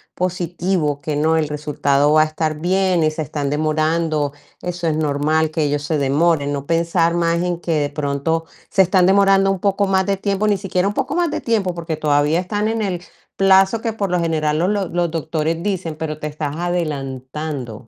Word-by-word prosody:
positivo, 175 -4 -1
que 150 0 -3
no, 160 +2 +2
el 155 - +1
resultado 145 -1 +1
va 155 0 +6
a - - +1
estar 155 -1 -2
bien 185 -1 +2
y 155 - +3
se 155 +1 -4
están 145 0 -3
demorando, 155 0 0 0.3
eso 175 -1 -3
es 155 - 0
normal, 155 +1 +1
que 155 -1 -1
ellos 145 0 -1
se 155 +1 -1
demoren. 145 +1 +2
No 140 -1 -3
pensar 170 +1 +1
más 170 0 +1
en 175 -1 -2
que 170 - -3
de 145 - 0
pronto 145 +3 -1 0.3
se 195 - +3
están 185 0 +4
demorando 195 0 +4
un 195 -2 0
poco 200 0 +1
más 190 -1 +2
de 195 0 0
tiempo, 200 +1 -1
ni 205 -2 +2
siquiera 185 0 0
un 205 - -4
poco 275 +5 -2
más 345 -3 +1
de - - -2
tiempo, 205 -6 0
porque 165 -2 -4
todavía 150 +2 +2
están 205 +3 -2
en 225 0 -1
el 180 -4 -2 0.4
plazo 195 +2 +4
que 225 -2 -2
por 200 -4 -2
lo 180 - +2
general 155 -2 0
los 180 - +1
los 200 -4 -1
los 175 -1 0
doctores 160 +1 -2
dicen, 185 -6 -2
pero 155 -1 -5
te 150 - -4
estás 150 -1 -4
adelantando. 140 -7 -4
165 Hz, 205 wpm, -20 LUFS, 150-185 Hz, 0.4 s, va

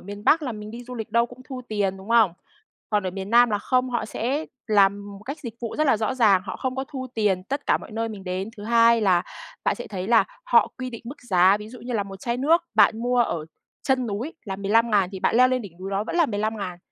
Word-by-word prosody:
miền 205 +2 -9
Bắc 320 0 +4
là 255 - -3
mình 210 0 -8
đi 240 +1 -9
du 250 - -8
lịch 225 -2 -6
đâu 235 +2 +3
cũng 245 +1 -14
thu 260 -2 -5
tiền, 200 -3 -1
đúng 190 +2 -12
không? 230 -6 +5 0.6
Còn 210 -1 +2
ở - - -1
miền 190 +2 -6
Nam 240 0 +6
là 205 - +1
không, 255 +4 0
họ 240 - -1
sẽ 270 +8 -2 0.2
làm 200 -1 +2
một - - -16
cách 280 +6 -5
dịch 235 -5 -7
vụ 230 -2 -4
rất 310 - +3
là 265 - +4
rõ 220 +4 -1
ràng, 205 -7 +4
họ 190 - -5
không 260 0 -3
có 265 - -2
thu 260 -2 -5
tiền 200 -4 +1
tất 280 +7 -4
cả - - +3
mọi - - -12
nơi 225 +1 -2
mình 205 -3 -8
đến. 185 +2 -3
Thứ 205 - -9
hai 230 0 +5
là 185 -4 +3 0.4
bạn - - +2
sẽ 240 - -8
thấy 190 -1 -5
là 230 -1 +5 0.2
họ - - +4
quy 255 0 -4
định 230 - -9
mức 255 +6 -8
giá, 185 +2 +5
ví 210 0 -9
dụ 245 +1 -11
như 245 +2 -6
là 215 - +1
một 195 -1 -9
chai 235 0 -2
nước 310 +7 +3
bạn 220 - +5
mua 245 +1 0
ở 170 -10 +1 0.4
chân 260 -2 +1
núi 225 +9 -4
là 190 -2 -4
15.000 205 -1 +2
thì 190 - -6
bạn - - +2
leo 255 +1 +6
lên 255 -2 0
đỉnh 200 - -9
núi 190 +1 -5
đó 200 +1 -1
vẫn 250 - -4
là 335 -3 +4
15.000, 205 -4 -3
225 Hz, 275 wpm, -24 LUFS, 200-250 Hz, 0.6 s, Nam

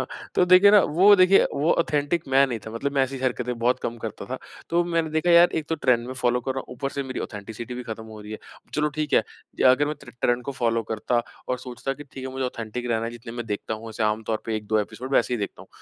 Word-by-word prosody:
अ, - - -1 0.3
तो - - +4
देखिए 185 +3 +7
ना 210 - +8 0.2
वो 205 +2 +8
देखिए 185 +1 +6
वो 145 +4 +2
ऑथेन्टिक 155 0 0
मैं 135 +1 +5
नहीं 120 -4 -3
था 110 - -5
मतलब 140 +5 -3
मैं 135 - +3
ऐसी 135 +1 -2
हरकतें 125 -1 -2
बहुत 120 +2 +2
कम 120 - -3
करता 110 -2 -6
था। 130 - -3 0.3
तो 170 +1 +3
मैंने 165 -2 0
देखा 160 +3 +1
यार 170 +1 +7
एक 150 - -13
तो 165 - +1
ट्रेंड 125 -6 +1
में 130 - -5
फ़ॉलो 125 -1 +1
कर 130 +2 -2
रहा 135 - -2
हूँ, - - -8
ऊपर 135 +2 -3
से 140 - -2
मेरी 130 -1 -5
ऑथेन्टिसिटी 110 +3 -7
भी 125 - -5
ख़त्म 110 -1 -7
हो 110 -1 -10
रही 105 +1 -9
है। 110 - -6 0.4
चलो 150 0 +2
ठीक 150 -1 -2
है, - - +5 0.5
अगर 140 +3 +3
मैं 150 - -2
टर्न 125 -3 -13
ट्रेंड 120 0 +1
को 140 - -4
फ़ॉलो 115 -3 0
करता 120 +2 0 0.3
और 125 - -1
सोचता 130 +2 -5
कि 145 - -10
ठीक 135 -1 -10
है - - -5
मुझे 130 0 -2
ऑथेन्टिक 120 -1 -5
ही - - -4
रहना 115 -1 0
है, 115 - -3
जितने 115 -1 -9
मैं 120 -1 -5
देखता 105 +1 -3
हूँ, 110 +1 -9
वैसे 110 0 -4
आमतौर 110 +1 -1
पे 110 -1 -1
1-2 110 +1 0
एपिसोड 115 +6 -6
वैसे 125 - +3
ही - - -2
देखता 100 - -5
हूँ। - - -18
125 Hz, 275 wpm, -25 LUFS, 115-145 Hz, 0.5 s, ना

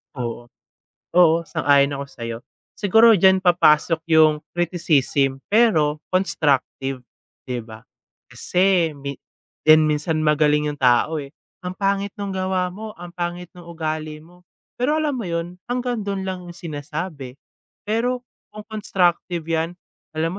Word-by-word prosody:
Oo. 120 -2 -5 0.7
Oo, 170 -1 +4
sang-ayon 140 -1 +2
ako 140 0 -4
sa'yo. 115 -1 -6 0.4
Siguro 225 +3 +5
diyan 190 -1 +5
papasok 170 -3 +3 0.2
yung 155 -1 +5
criticism, 150 -6 +1
pero 160 -10 +2
constructive, 135 -7 0 0.4
'di 125 -2 -3
ba? 110 -1 -13 0.4
Kasi 180 -5 +1
min 140 0 -5 0.5
'di 155 0 +7
din 155 - +3
minsan 150 +1 0
magaling 150 0 +3
yung 145 - -14
tao, 130 +5 +3
eh, 140 - -9 0.3
"Ang 180 0 -6
pangit 200 0 0
nung 200 -1 -4
gawa 185 -1 -1
mo. 215 +2 -9
Ang 175 0 -10
pangit 175 0 -5
nung 175 -1 -13
ugali 155 -2 -4
mo." 175 +3 -19 0.3
Pero 290 +6 0
alam 305 -2 0
mo 245 -4 -4
yun? 170 +2 -4
Hanggang 245 -2 -2
dun 200 -1 -3
lang 180 -2 -5
yung 175 - -11
sinasabi, 150 -3 -6 0.5
pero 245 +3 -1 0.2
kung 210 0 -11
constructive 180 -5 -1
'yan, 165 +1 -2 0.4
"Alam 165 +1 0
170 Hz, 140 wpm, -22 LUFS, 150-190 Hz, 0.7 s, di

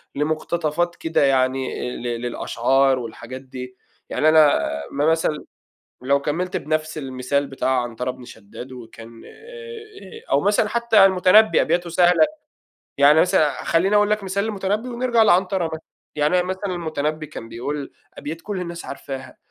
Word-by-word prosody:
لمقتطفات 155 +3 -1
كده، 165 -3 0
يعني 130 -1 0
ل 120 -1 -4
للأشعار 130 +2 +1
والحاجات 120 +2 -8
دي. 125 -1 -9 0.3
يعني 155 - +2
أنا 155 -2 +5 0.3
م - - -8
مثلًا، 160 -2 -1 0.6
لو 140 +2 +2
كمّلت 175 +6 -2
بنفس 155 +1 -2
المثال 135 +1 -2
بتاع 130 -1 0
عنترة 120 +1 -4
بن 125 -1 -13
شداد، 110 +5 -11
وكان 115 -2 -12
آآ 455 - -12
أو 140 - +3
مثلًا 205 +2 +2
حتى 235 -4 +4
المُتَنبّي 195 +3 +5
أبياته 170 +1 0
سهلة. 180 - +4 0.7
يعني 145 +3 +6
مثلًا 155 -4 +1
خلّيني 190 +5 +2
اقول 205 0 +3
لك 210 -1 +1
مثال 195 +1 -1
للمُتَنبّي، 210 +2 -2
ونرجع 240 -1 +1
لعنترة 185 -2 +3
مثلًا. 160 0 -6 0.3
يعني 150 +3 +1
أنا 180 - -3
مثلًا 190 +2 -4
المُتنَبّي 155 -2 -3
كان 115 -5 -9
بيقول 140 +4 -5 0.2
أبيات 160 +3 -7
كل 200 -1 -5
الناس 170 -1 -6
عارفاها: 135 -1 -8
155 Hz, 145 wpm, -22 LUFS, 130-190 Hz, 0.7 s, يعني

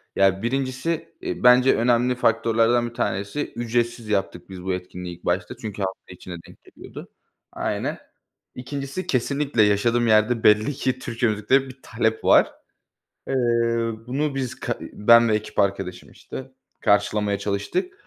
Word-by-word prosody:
Ya, 95 0 +3
1'incisi, 135 +6 -2
eee, - - -5
bence 125 +1 +6
önemli 120 +1 +2
faktörlerden 120 0 +2
1 - - -18
tanesi 100 +8 -3
ücretsiz 120 -1 -1
yaptık 95 -3 -2
biz 90 -1 -9
bu 95 0 -1
etkinliği 90 -1 -6
ilk - - -22
başta 90 +6 -1
çünkü 105 -4 -7
hafta 95 -1 -5
içine 90 0 -9
denk - - -18
geliyordu. - - -12 0.4
Aynen. - - -3 0.6
2'ncisi 140 +7 -5
kesinlikle 140 -1 +1
yaşadığım 115 +4 +2
yerde 110 +2 +3
belli 105 +6 +4
ki 130 -1 -2
Türkçe 115 -1 -1
müziklere 130 +6 +1
bir 130 0 -13
talep 110 -1 -1
var. - - +5 0.8
Eee, 135 - -1 0.7
bunu 140 +3 -1
biz, 130 -3 -4
ka - - -2
eee, - - -8
ben 115 +2 +5
ve 110 - +2
ekip 110 - -7
arkadaşım, 95 -2 -1
işte, 130 0 -9 0.3
karşılamaya 100 0 +1
çalıştık 105 - -2
115 Hz, 145 wpm, -23 LUFS, 100-130 Hz, 0.8 s, bence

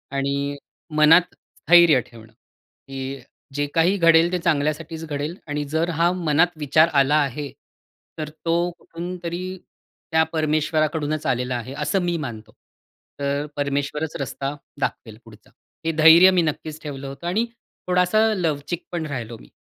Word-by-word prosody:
आणि 140 +1 -1 0.4
मनात 160 +4 +5
स्थैर्य 170 -5 +4
ठेवणं, 115 -2 -16 0.6
की 135 0 -6 0.3
जे 145 +1 0
काही 175 +5 +3
घडेल 165 -1 +5
ते 180 - +1
चांगल्यासाठीच 160 0 -1
घडेल 150 +2 -4
आणि 145 0 -2
जर 165 +2 +1
हा 170 +1 +4
मनात 170 -1 +1
विचार 155 +2 +4
आला 140 +1 +4
आहे. 140 +1 -5 0.7
तर 155 -1 -4
तो 170 +3 -1
कुठूनतरी 180 +1 -6 0.5
त्या 160 0 +4
परमेश्वराकडूनच 155 0 0
आलेला 125 0 0
आहे 120 +2 -5
असं 150 +6 0
मी 175 -1 -1
मानतो. 110 -7 -7 0.7
तर 140 +1 -1
परमेश्वरच 145 +2 -2
रस्ता 140 +1 -4 0.3
दाखवेल 110 -5 -3
पुढचा. 110 -2 -17 0.4
हे 165 - +1
धैर्य 165 +4 +7
मी 185 -2 +3
नक्कीच 155 0 -4
ठेवलं 140 -2 -6
होतं 135 +5 -7
आणि 210 +7 +1 0.4
थोडासा 180 +3 +2 0.2
लवचिक 165 -1 -2
पण 170 -2 -3
राहिलो 120 -6 -5
मी. - - -17
155 Hz, 140 wpm, -22 LUFS, 140-170 Hz, 0.7 s, धैर्य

